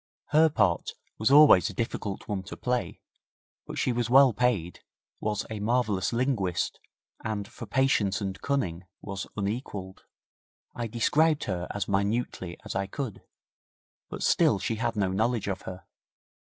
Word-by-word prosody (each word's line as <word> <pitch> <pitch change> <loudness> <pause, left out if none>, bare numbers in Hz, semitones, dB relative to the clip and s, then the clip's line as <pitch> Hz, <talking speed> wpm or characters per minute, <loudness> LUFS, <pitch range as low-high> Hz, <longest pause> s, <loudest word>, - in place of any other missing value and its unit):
Her 160 +2 +5
part 90 - +1 0.3
was 110 - +2
always 145 -9 +7
a - - -9
difficult 110 -4 -3
one 100 -2 -2
to - - -8
play, 125 -1 -2 0.7
but - - -6
she - - +1
was 120 -1 -1
well 135 -1 +7
paid, 105 -9 0 0.4
was 105 -1 -2
a 110 - -4
marvellous 105 -3 +1
linguist, 115 -8 -1 0.4
and 105 -2 -3
for 120 - -10
patience 130 -7 +2
and 95 -2 -4
cunning 95 -11 -1 0.2
was 100 -1 -5
unequalled. 100 -2 -4 0.7
I 120 - -3
described 150 +7 +2
her 90 -2 -3
as 100 - -3
minutely 100 -3 -1
as - - -5
I 95 0 -1
could, 120 0 -5 0.9
but - - -5
still - - +4
she 105 +4 -2
had 115 +1 -1
no 95 -3 +1
knowledge 110 +3 0
of 95 -2 -3
her. 90 0 -9
105 Hz, 150 wpm, -28 LUFS, 95-125 Hz, 0.9 s, always